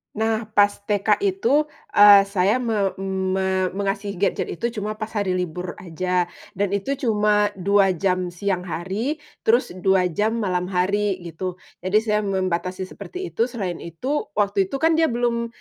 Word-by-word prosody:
Nah 220 +1 0
pas 205 -1 +6 0.2
TK 210 - +1
itu, 375 -7 +2 0.3
eee, 205 -1 +8
saya 200 +4 +2
me 215 -5 0
me 190 -1 0
mengasih 200 0 -3
gadget 195 0 0
itu 235 - -2
cuma 210 0 -3
pas 215 - -3
hari 200 -3 0
libur 180 0 -3
aja, 180 +1 -1 0.2
dan 200 +2 -1
itu 270 +8 -2
cuma 210 -3 +2
2 195 0 +3
jam 185 0 0
siang 180 +2 -2
hari, 195 - -2 0.3
terus 235 +3 +3
2 185 0 +2
jam 215 +6 0
malam 180 -5 -1
hari, 195 +2 +1
gitu. 175 +2 -5 0.2
Jadi, 195 +4 +1
saya 210 -2 +1
membatasi 185 -1 -1
seperti 370 +1 -7
itu, 230 - +1
selain 195 -9 -4
itu, 255 - -3
waktu 200 -2 +1
itu 275 - -5
kan 325 0 +4
dia 325 - +4
belum 235 -2 0
200 Hz, 160 wpm, -23 LUFS, 185-220 Hz, 0.3 s, eee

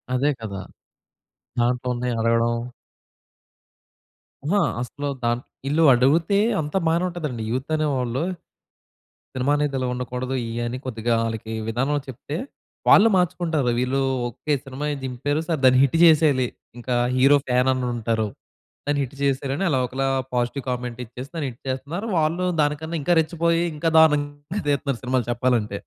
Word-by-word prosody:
అదే 140 +4 +2
కదా! 100 -3 -5 1.0
దాంట్లుందే 125 0 0
అడగడం. 115 +1 +2 1.9
అహా! 200 +6 +2 0.2
అసలు 140 +3 -5 0.2
దాంట్ 120 +1 0 0.2
ఈళ్ళు 160 +3 +2
అడిగితే 160 +10 +3 0.2
అంతా 150 +5 -2
బానే 170 +2 +2
ఉంటదండి 150 -10 -4
యూత్ 130 +5 -3
అనేవాళ్ళు. 135 -4 0 1.1
సినిమా 130 +2 0
అనేది 145 -2 0
ఇలా 130 - -1
ఉండకూడదు, 125 +1 -4
ఇయి 115 +1 -3
అని 120 +2 -3
కొద్దిగా 115 -1 -1
ఆళ్ళకి 110 0 -4
విధానంలో 135 +6 0
చెప్తే, 145 +5 -6 0.5
వాళ్ళు 225 +3 +8
మార్చుకుంటారు. 170 -7 +1
వీళ్ళు 130 +2 0 0.3
ఓకే! 150 +5 -3
సినిమాయే 145 +3 -3
దింపారు 140 +4 -1
సరె 160 -4 0
దాన్ని 130 0 +6
హిట్ 140 +4 +2
చేసేయాలి 150 -6 +5 0.3
ఇంకా 125 +1 -2 0.2
హీరో 140 +3 +6
ఫ్యాననుంటారు. 125 -3 +1 0.6
దాన్ని 145 -1 +1
హిట్ 135 +1 -8
చేసేయాలి 135 0 0
అని 195 - 0
అలా 130 -3 +2
ఒకలా 135 +2 -2 0.3
పాజిటివ్ 125 +3 -1
కామెంట్ 125 -1 -4
ఇచ్చేసి 125 +4 -9
దాన్ని 150 -4 -2
హిట్ 120 - -19
చేస్తున్నారు. 145 - -4
వాళ్ళు 165 +3 +1 0.2
దానికన్నా 155 +3 -1
ఇంకా 175 +5 +2
రెచ్చిపోయి 170 +1 0
ఇంకా 165 +2 0
దారుణంగా 145 +4 +1
తీత్తన్నారు 140 -3 -1
సినిమాలు 125 -2 0
చెప్పాలంటే. 120 -4 0
135 Hz, 135 wpm, -23 LUFS, 125-150 Hz, 1.9 s, వాళ్ళు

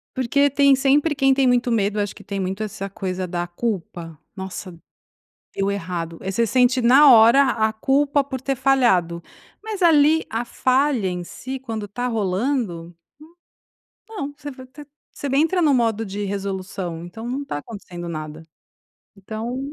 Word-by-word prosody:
Porque 280 +3 +2
tem 280 0 +4
sempre 285 +3 +2
quem 270 -1 +3
tem 270 0 +2
muito 245 0 +2
medo, 210 -1 0
acho 205 -1 -2
que - - -13
tem 200 -1 -5
muito 190 +3 -3
essa 195 -1 -5
coisa 185 -1 -4
da 175 0 -3
culpa. 175 -4 -5 0.2
"Nossa, 190 -1 -7 0.8
deu 195 0 0
errado", 170 -4 -4
aí 190 - -3
você 230 +4 +1
sente 250 +3 +3
na 265 +4 +7
hora 230 +4 +7
a 220 -4 +1
culpa 280 +5 +1
por 265 -2 -6
ter 270 +1 -1
falhado. 235 -11 +2 0.4
Mas 430 -4 -5
ali 315 -1 +5
a 230 +2 -2
falha 255 -4 +1
em 180 -1 -4
si, 260 +8 -7
quando 225 -5 -6
tá 245 +5 -4
rolando, 200 -5 -2 1.2
n 445 - -11
não, 285 -7 -4
você 290 -1 -7
vai, 260 -1 -12 0.5
você 285 - -6
entra 330 +5 +2
no 295 -4 +4
modo 225 -3 +1
de 205 +1 -5
resolução, 190 -3 -4
então 225 +6 -8
não 270 +4 -3
tá 210 - -5
acontecendo 175 -2 -8
nada. 155 -1 -6 0.7
Então 220 +6 -5
225 Hz, 160 wpm, -22 LUFS, 190-270 Hz, 1.2 s, na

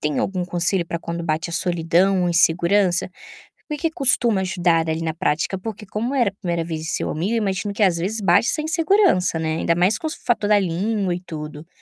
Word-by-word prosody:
tem 150 -1 -1
algum 185 -2 -1
conselho 175 0 0
pra 170 - -4
quando 170 0 -5
bate 160 +1 -1
a - - -7
solidão 175 +2 +1
ou 175 - +1
insegurança? 175 +2 +2 0.6
Por 300 - -3
que 330 +1 0
costuma 245 - +2
ajudar 175 -3 +1
ali 160 +1 -2
na 160 -1 -2
prática? 165 +2 -1
Porque 210 +2 -7
como 230 +7 -3
era 240 -6 +3
a - - -18
primeira 170 -4 -2
vez 160 -1 -5
de 160 - -6
seu - - -2
amigo 180 +8 -2
eu - - +1
imagino 200 -1 -2
que 210 - 0
às 180 -4 +3
vezes 200 +6 -2
bate 205 +4 +3
essa 275 - 0
insegurança, 320 - +2
né, 160 0 -1
ainda 170 - +1
mais 185 +5 +2
com 320 - -4
o - - -2
s - - -7
fator 220 -4 +1
da 210 - +5
língua 195 +1 -1
e 175 - -7
tudo. 155 -2 -8
180 Hz, 230 wpm, -21 LUFS, 170-210 Hz, 0.6 s, da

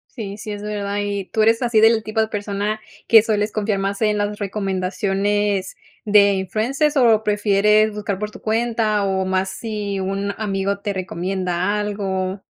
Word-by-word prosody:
Sí, 205 -4 -6
sí, 210 0 -6
es 205 0 -7
verdad. 205 -1 -3
¿Y 200 -1 -2
tú 220 - -1
eres 225 +2 +3
así 235 -3 +3
del 225 0 +5
tipo 215 +1 -1
de 220 - -1
persona 205 +1 -2 0.3
que 225 -2 +7
sueles 210 -1 0
confiar 210 -2 -1
más 195 +2 -2
en 210 -1 +2
las 205 0 -2
recomendaciones 195 0 -1 0.3
de 200 -1 +5
influencers 240 - 0
o 230 -5 +4
prefieres 210 0 +3
buscar 205 -2 -3
por 210 +2 -4
tu - - -12
cuenta 220 -2 0
o 190 -1 0
más 190 0 0
si 210 -3 -4
un 195 +1 -2
amigo 200 -2 -1
te 200 0 -3
recomienda 185 +1 -2
algo? 195 -2 -3
205 Hz, 165 wpm, -21 LUFS, 195-215 Hz, 0.3 s, que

